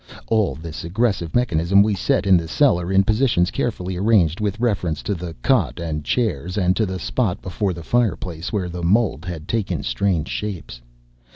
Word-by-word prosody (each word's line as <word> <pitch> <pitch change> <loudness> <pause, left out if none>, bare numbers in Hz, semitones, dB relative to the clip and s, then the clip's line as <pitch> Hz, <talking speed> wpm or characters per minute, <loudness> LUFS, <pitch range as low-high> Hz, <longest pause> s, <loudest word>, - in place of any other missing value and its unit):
All 110 -3 +2
this 80 0 -7
aggressive 95 -2 -1
mechanism 100 -5 +3
we 105 0 +1
set 100 - 0
in 95 -1 +6
the 85 -2 +1
cellar 90 - +2
in 95 0 +5
positions 110 -4 +2
carefully 90 0 -2
arranged 95 -5 +3
with 105 0 -2
reference 95 -10 -1
to 105 - -1
the 85 -2 -6
cot - - +2
and 80 -3 -3
chairs, 90 - -1
and 90 -2 +2
to 110 -1 +1
the 95 0 -3
spot 100 +2 -1
before 95 +1 -2
the 85 -2 -7
fireplace 95 -7 -1
where 100 -4 -1
the 90 0 -6
mold 95 -2 +1
had 85 -2 -6
taken 110 -2 -1
strange 80 +5 0
shapes. 90 -12 -5
95 Hz, 180 wpm, -21 LUFS, 85-105 Hz, -, in